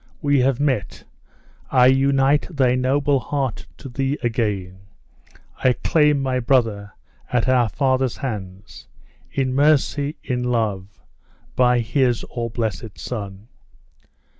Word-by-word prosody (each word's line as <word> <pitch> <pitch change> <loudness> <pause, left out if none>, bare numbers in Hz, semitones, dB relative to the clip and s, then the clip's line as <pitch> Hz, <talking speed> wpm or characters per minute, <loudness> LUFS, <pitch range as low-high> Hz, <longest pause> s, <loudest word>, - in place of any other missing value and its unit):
We 145 -2 +2
have 130 0 +1
met 135 -8 -1 0.7
I 125 -2 +4
unite 135 +2 +3
thy 135 -7 +2
noble 135 +2 +1
heart 135 -3 -3
to 140 - -10
thee 135 +3 -2
again 105 -6 -2 0.8
I 130 - +5
claim 150 0 +2
my 130 -1 0
brother 115 -6 0 0.4
at 125 0 +1
our 125 -3 +3
Father's 130 -2 0
hands 100 -6 -7 0.4
in 130 -2 -1
mercy! 145 +1 +2
in 125 -2 -2
love 105 -5 -2 0.5
by 125 -1 +3
his 125 0 0
all 120 -1 -5
blessed 110 -2 -4
Son!" 100 -3 -7
125 Hz, 115 wpm, -21 LUFS, 115-135 Hz, 0.8 s, I